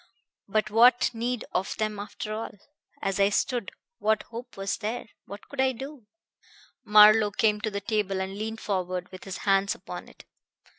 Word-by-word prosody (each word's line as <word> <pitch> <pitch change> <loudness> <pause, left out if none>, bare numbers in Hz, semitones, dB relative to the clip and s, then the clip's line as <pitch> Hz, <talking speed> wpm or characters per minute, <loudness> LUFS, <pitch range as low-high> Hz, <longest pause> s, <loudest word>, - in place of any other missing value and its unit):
But 215 +1 0
what 240 +3 +5
need 240 +1 -2
of 185 +2 -2
them, 215 -1 -2
after 210 +1 -5
all? 215 -1 -5 0.5
As 195 0 -1
I 200 0 +5
stood, 235 +1 -1 0.3
what 220 0 +2
hope 240 +1 -9
was 195 0 -2
there? 225 +3 -3 0.2
What 200 +1 -10
could 280 -2 -2
I 265 0 +3
do?" 265 -2 -9 0.8
Marlowe 210 0 +7
came 210 +1 +1
to 215 - -1
the 200 -1 -4
table 200 -2 -1
and 190 +1 -3
leaned 220 +2 -5
forward 185 -2 -2
with 185 - -10
his 195 -1 -5
hands 195 0 +3
upon - - -9
it. - - -17
210 Hz, 170 wpm, -27 LUFS, 200-225 Hz, 0.8 s, Marlowe